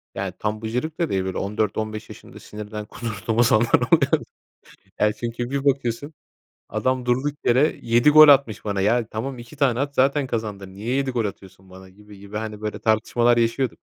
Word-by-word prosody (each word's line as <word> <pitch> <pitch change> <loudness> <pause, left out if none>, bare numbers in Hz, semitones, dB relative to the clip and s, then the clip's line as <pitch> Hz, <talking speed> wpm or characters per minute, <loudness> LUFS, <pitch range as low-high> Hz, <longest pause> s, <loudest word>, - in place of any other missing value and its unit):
Yani, - - -3
tam 105 0 -3
bıcırık 125 +9 -3
da 170 - 0
değil, 95 -1 0
böyle 95 -1 -4
14-15 110 +1 -3
yaşında - - -12
sinirden 105 0 -8
kudurduğum 115 +1 -1
zamanlar 115 0 +3
oluyordu. - - +3 0.8
Ya, 105 0 +3
çünkü 120 +2 -4
bir 140 0 -3
bakıyorsun 135 +1 -1 0.6
adam 125 +4 -1
durduk 130 +4 0
yere 130 +6 +3
7 120 +5 +4
gol 155 0 +9
atmış 130 -7 +4
bana. 100 -2 -2
Ya, 110 +4 +2
tamam 125 +4 -5
2 120 +5 -12
tane 130 -4 +1
at 140 0 -2
zaten 140 +2 +2
kazandın. 105 -5 -5
Niye 110 +5 -3
7 135 -1 0
gol 120 -3 -1
atıyorsun 95 -1 -8
bana, 95 0 -13
gibi 105 +2 -16
gibi, 100 +1 -10
hani, 110 -1 -5
böyle 105 -1 -4
tartışmalar 115 +2 +2
yaşıyorduk. 120 +1 0
115 Hz, 175 wpm, -23 LUFS, 105-130 Hz, 0.8 s, gol